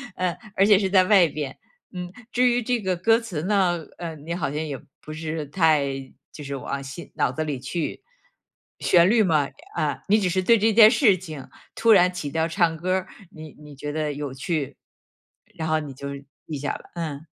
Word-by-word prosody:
嗯， 180 -2 -1 0.2
而 195 - +4
且 205 -1 +6
是 195 -1 0
在 190 -1 +5
外 195 -4 +6
边， 145 -3 -5 0.4
嗯。 180 -1 -6 0.2
至 250 +1 +3
于 245 0 +2
这 245 0 -1
个 190 -2 0
歌 225 +6 +4
词 205 -10 -5
呢， 185 -3 +2 0.2
嗯， 160 -4 -7
你 170 +1 -3
好 160 -6 -2
像 150 +2 -2
也 145 -3 -4 0.2
不 155 - -8
是 155 -1 -4
太 150 -2 +2 0.4
就 150 - -9
是 140 0 -5
往 140 +1 -4
心 135 +5 -9
脑 - - +1
子 155 - -3
里 145 -4 -3
去。 160 - -4 0.8
旋 175 +1 +5
律 220 0 +4
嘛 155 -7 +2 0.3
啊， 145 -3 -2
你 210 +2 +4
只 185 - +1
是 185 +2 +1
对 230 +5 +5
这 220 +2 +3
件 215 0 +9
事 220 -5 +4
情， 155 -6 -9 0.3
突 230 - +3
然 180 -3 +6
起 165 -5 -4
调 160 +1 0
唱 165 -1 +1
歌 180 +3 -1
儿， 190 - -2 0.2
你 155 -1 -11
你 150 -1 -12
觉 145 +2 -5
得 150 -1 -2
有 140 -2 -5
趣， 140 +1 -3 0.8
然 160 - -3
后 155 0 +2
你 145 -2 -7
就 140 +2 -7 0.4
记 155 - -4
下 145 - -2
了， - - -10
嗯。 160 -3 -5
165 Hz, 220 characters per minute, -24 LUFS, 150-190 Hz, 0.8 s, 件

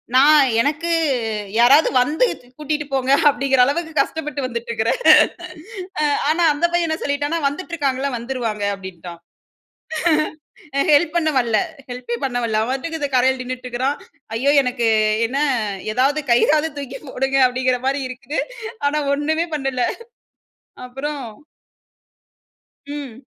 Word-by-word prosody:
நான், 285 +1 +6
எனக்கு 305 +5 -1 0.7
யாராவது 270 +6 +6
வந்து, 300 - +2 0.2
து - - -22
கூட்டிகிட்டு 300 0 -2
போங்க 265 0 +1 0.2
அப்பிடீங்கிற 270 -1 +2
அளவுக்கு 320 +4 -2
கஷ்டப்பட்டு 300 0 -2
வந்துட்ருக்குறேன். 235 - -2 1.0
அ - - +2 0.3
ஆனா, 335 +3 +2
அந்த 295 +4 0
பையன் 345 -1 +2
என்ன 315 - -1
சொல்லிட்டானா? 290 +3 -1
வந்துட்டுருக்காங்கல்ல. 280 -3 -2
வந்துருவாங்க 235 -3 -3
அப்பிடீன்ட்டான். 180 -3 -10 1.7
ஹெல்ப் 310 +3 +3
பண்ண 325 -2 +2
வல்ல. 235 -3 +1 0.3
ஹெல்பே 245 -1 -4
பண்ண 255 -2 -1
வரல. 220 -2 0
அவன் 230 +3 -1
பாட்டுக்கு 320 +5 -3
இந்த 285 - -1
கரைல 260 +1 +3
நின்னுட்டிருக்குறான். 255 +2 -3 0.4
ஐயோ! 270 +5 +2
எனக்கு 245 -3 -1 0.4
என்ன, 265 +4 -3 0.6
ஏதாவது 275 +5 +2
கையிறாவது 300 +6 +3
தூக்கி 270 -1 -6
போடுங்க, 270 +1 -1
அப்பிடீன்கிற 255 0 0
மாரி 275 +1 0
இருக்குது. 260 +4 -5 0.5
ஆனா 295 +1 0 0.2
ஒண்ணுமே 315 +3 0
பண்ணல. 270 -3 -1 1.0
அப்புறம். 280 +3 -5 1.7
ம். 275 -4 -8
270 Hz, 120 wpm, -20 LUFS, 250-295 Hz, 1.7 s, நான்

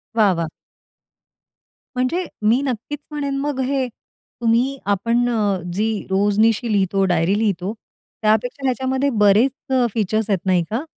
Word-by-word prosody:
वाह, 210 -4 +5
वाह! 165 -1 -2 1.5
म्हणजे 265 +9 0 0.2
मी 245 +5 +4
नक्कीच 265 +3 -4
म्हणेन 280 -2 -2
मग 285 -1 -2
हे, 265 0 0 0.5
तुम्ही 240 +4 +2
आपण 230 +5 +1
अ, 205 -5 0
जी 215 +1 -1
रोजनिशी 210 +4 +2
लिहितो, 195 -1 +2
डायरी 175 +2 +2
लिहितो, 200 -2 -1 0.5
त्यापेक्षा 220 +6 +1
ह्याच्यामध्ये 265 +2 0
बरेच 210 +7 +5 0.2
अ, 250 -2 +3
फीचर्स 215 0 0
आहेत 190 -2 0
नाही 180 -2 +3
का? 245 +7 -1
225 Hz, 130 wpm, -21 LUFS, 200-260 Hz, 1.5 s, वाह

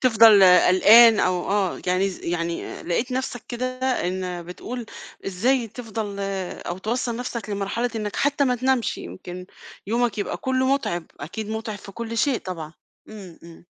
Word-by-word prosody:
تفضل 225 -4 +7 0.2
قلقان 220 +5 +7
أو 180 0 0
آه، 200 -3 0
يعني 185 +2 +2
ز 185 - -9
يعني 170 0 -2
آآ - - -8
لقيت 240 +9 -1
نَفسك 255 -2 -3
كده 245 +1 -3 0.4
إن 180 -1 -3
بتقول 225 +7 -7 0.4
إزاي 230 +6 +1
تفضل 220 -3 -6 0.5
أو 175 +2 -4
توصّل 235 +3 -2
نَفسك 235 -3 -5
لمرحلة 205 +4 -2
إنّك 210 -1 -4
حتى 285 0 +2
ما 250 -1 +2
تنامش، 255 -1 0
يمكن 175 - -8 0.4
يومك 230 0 0
يبقى 205 - -2
كلّه 260 0 0
مُتعِب، 175 -11 -3
أكيد 205 +9 -6
مُتعِب 220 -1 -4
في 195 - -12
كل 230 +1 -5
شيء 265 +1 +2
طبعًا. 165 -4 -7 0.4
إمم، 195 -6 -11
إمم. 170 0 -14
215 Hz, 155 wpm, -23 LUFS, 185-240 Hz, 0.5 s, تفضل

